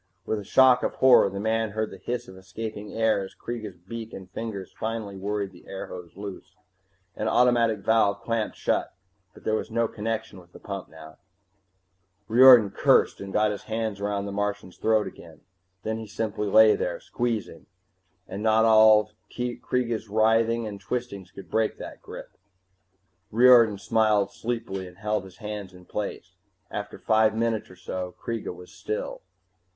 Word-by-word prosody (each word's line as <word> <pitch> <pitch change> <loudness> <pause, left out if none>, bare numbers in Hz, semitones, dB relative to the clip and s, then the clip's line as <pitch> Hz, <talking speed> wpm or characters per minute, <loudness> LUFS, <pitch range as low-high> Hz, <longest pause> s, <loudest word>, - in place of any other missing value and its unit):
With 110 - -1
a - - -7
shock 130 +4 +5
of - - -2
horror, 130 -6 +6
the 100 +1 -6
man 110 +1 0
heard 110 0 -2
the - - -10
hiss 125 0 -4
of 95 - -12
escaping 105 +3 -7
air 110 -2 +1
as 95 - -8
Kreega's 110 -6 -6
beak 110 +6 -8
and 95 -1 -10
fingers 100 -3 -6
finally 110 -3 -4
worried 100 0 -3
the 90 - -17
airhose 90 -2 -8
loose. 100 -1 -8 0.6
An - - -2
automatic 120 -4 +3
valve 105 -2 +2
clamped 115 -2 -2
shut, - - -1 0.4
but - - -16
there 110 - 0
was 110 - -1
no 115 0 +1
connection 110 -2 -4
with 85 -1 -19
the - - -12
pump 100 -2 -7
now 80 -1 -13 1.1
Riordan 120 -3 +8
cursed, - - +3
and 100 0 -7
got 105 +1 +2
his 100 - -7
hands 110 -2 -3
about 100 -1 -1
the 100 - -5
Martian's 105 -2 -3
throat 110 -1 +2
again. 85 -3 -12 0.4
Then 110 +1 -2
he 110 - -7
simply 110 0 -3
lay 110 +2 +6
there, 85 -1 -3
squeezing, 120 -3 -3 0.6
and 95 +2 -6
not 110 +1 +4
all 110 -1 +6 0.2
Kreega's 120 -2 -2
writhing 115 +2 +2
and 100 -2 -7
twistings 100 -2 -4
could 95 -3 -13
break 110 -1 +1
that - - -9
grip. - - -10 1.0
Riordan 115 -2 +6
smiled 105 +1 +2
sleepily 115 -5 -4
and 90 0 -14
held 105 -1 -2
his 95 -1 -14
hands 105 -4 -7
in 90 0 -15
place. 100 -2 -6 0.3
After 105 0 -5
five 110 -1 +2
minutes 115 -1 -1
or 90 - -13
so 90 0 -6
Kreega 115 -2 -4
was 90 0 -12
still. - - -5
105 Hz, 165 wpm, -26 LUFS, 100-115 Hz, 1.1 s, Riordan